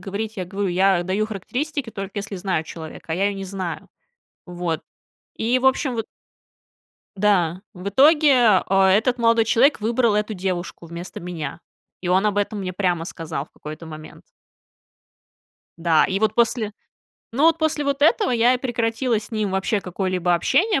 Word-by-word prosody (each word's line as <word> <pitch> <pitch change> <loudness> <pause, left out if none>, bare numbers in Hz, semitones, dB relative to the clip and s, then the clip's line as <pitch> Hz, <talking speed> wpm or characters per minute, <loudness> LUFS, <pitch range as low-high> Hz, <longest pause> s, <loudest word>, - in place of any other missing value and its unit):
говорить, 205 +3 -5
я 185 - -3
говорю, 195 +2 -3
я 185 0 +3
даю 190 +4 -1
характеристики, 250 - -4
только 195 -1 -6
если 205 0 -5
знаю 180 -3 -1
человека, 160 0 -8
а - - +1
я 195 +4 +1
её 200 -1 -2
не 195 - -5
знаю. 185 -3 -5 0.6
Вот, 175 -2 -3 0.6
и, 240 +3 +1
в 265 - +1
общем, 265 -1 +2
вот 225 - -3 1.1
Да, 185 -4 +2
в 180 +2 -5
итоге, 265 - +5
э, 195 - +1 0.2
этот 245 +3 +1
молодой 230 -1 +4
человек 240 +4 +3
выбрал 230 0 +2
эту 210 +1 -1
девушку 180 -2 -4
вместо 170 +2 -8
меня, 170 -4 -6 0.4
и 180 - -4
он 190 +3 +3
об 205 -1 +1
этом 205 0 -1
мне 185 -1 -4
прямо 175 -3 0
сказал 165 -5 -5
в - - -34
какой-то 155 +2 -9
момент. 155 -1 -10 1.6
Да, 165 -2 +4
и 195 +1 0
вот 215 0 +1
после 230 -2 +1 0.6
Ну, 280 +6 +1
вот 330 0 +5
после 310 -2 0
вот 280 0 -1
этого 400 - +4
я 240 +2 +4
и - - -2
прекратила 235 -1 0
с - - -12
ним 215 -3 -1
вообще 200 +2 0
какое-либо 180 -1 -1
общение, 295 - +2
205 Hz, 170 wpm, -22 LUFS, 180-235 Hz, 1.6 s, итоге